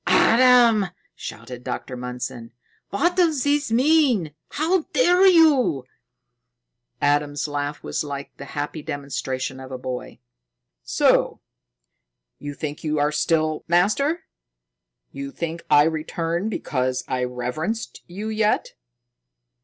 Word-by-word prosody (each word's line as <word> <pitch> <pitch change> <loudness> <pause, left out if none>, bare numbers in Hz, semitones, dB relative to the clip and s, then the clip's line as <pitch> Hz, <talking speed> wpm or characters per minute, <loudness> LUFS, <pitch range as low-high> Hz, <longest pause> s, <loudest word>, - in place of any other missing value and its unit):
"Adam!" 235 -4 +5 0.3
shouted 125 -1 -8
Dr. 130 - -5
Mundson. 125 -1 -6 0.4
"What 345 - +1
does 325 -7 +2
this 285 -3 +1
mean? 250 - +3 0.2
How 330 +5 +1
dare 365 -4 +5
you!" 295 - +4 1.1
Adam's 145 0 +1
laugh 145 0 -4
was - - -2
like 140 -1 -7
the 140 - -8
happy 145 +2 -3
demonstration 135 -2 -4
of 130 0 -10
a 130 - -4
boy. 125 0 -6 0.6
"So? - - +2 1.0
You 145 0 -6
think 150 -1 -5
you 155 -1 -1
still 155 0 +1
are - - -17
master? 210 - +2 0.9
You 140 0 -6
think 165 +3 -5
I 145 - +7
returned 165 +4 -2
because 130 -10 -2
I 125 -1 -1
reverenced 125 - -4
you 200 +5 -5
yet?" 215 -1 0
160 Hz, 115 wpm, -23 LUFS, -, 1.1 s, I